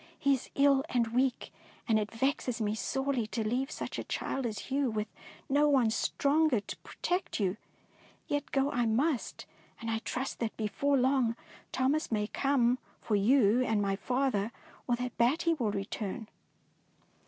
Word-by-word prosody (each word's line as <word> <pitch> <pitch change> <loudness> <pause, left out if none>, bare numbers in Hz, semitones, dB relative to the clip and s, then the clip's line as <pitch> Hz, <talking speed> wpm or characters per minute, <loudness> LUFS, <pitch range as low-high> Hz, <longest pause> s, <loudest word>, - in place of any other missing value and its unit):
He 280 - +3
is 265 - -3
ill 275 -1 +4
and 235 -2 +1
weak, 255 0 0 0.3
and 220 -2 +4
it 210 0 -2
vexes 250 0 -1
me 210 -1 0
sorely 265 +1 -1
to 220 -1 -2
leave 255 +5 0
such - - -5
a - - -3
child 270 -3 -2
as 215 +3 -6
you 275 -1 +2
with 215 -1 -2 0.4
no 290 +2 +4
one 255 -6 +4
stronger 285 +3 +2
to 205 - -7
protect 360 -6 -3
you. 190 -2 +1 0.7
Yet 290 0 -2
go 275 +1 +2
I 240 -1 +1
must, 255 +4 0 0.3
and 230 0 -3
I 225 - 0
trust 255 +4 -4
that 230 -2 -3
before 275 +6 +1
long 255 -3 +2 0.4
Thomas 270 +4 +1
may 210 -2 +1
come 255 +1 +2 0.2
for 215 - -1
you 230 +2 +4
and 220 -4 +1
my 200 -1 +1
father, 245 -2 0 0.4
or 245 - +3
that 245 0 -5
Batty 315 +8 +3
will 245 -9 0
return." 205 +2 -4
245 Hz, 165 wpm, -31 LUFS, 220-275 Hz, 0.7 s, ill